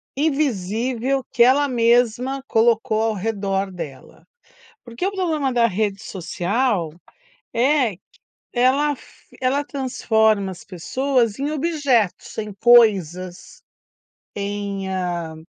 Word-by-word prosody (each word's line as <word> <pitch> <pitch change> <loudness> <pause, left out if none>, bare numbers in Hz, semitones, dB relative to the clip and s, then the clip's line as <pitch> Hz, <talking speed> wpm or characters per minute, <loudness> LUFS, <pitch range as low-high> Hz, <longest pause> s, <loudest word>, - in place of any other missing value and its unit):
invisível 260 - -1
que 235 - +5
ela 275 +4 +4
mesma 245 +2 +2
colocou 225 -1 +2
ao 225 0 +1
redor 195 -1 -2
dela. 160 -8 -9 0.6
Porque 235 +8 -5
o 390 - 0
problema 320 -9 -1
da 235 -1 +4
rede 200 -1 -2
social, 190 +1 -1 0.7
é 255 -1 +2
q 175 - -24 0.5
ela 265 +4 +2
f 275 - -17
ela 265 +3 +1
transforma 220 -7 +1
as 185 - -11
pessoas 235 +5 -1
em 285 +2 -2
objetos, 285 - 0
em 210 -1 -4
coisas, 185 -7 +3 0.7
em, 200 -1 -4
hã, 175 -4 -3
230 Hz, 110 wpm, -21 LUFS, 195-265 Hz, 0.7 s, que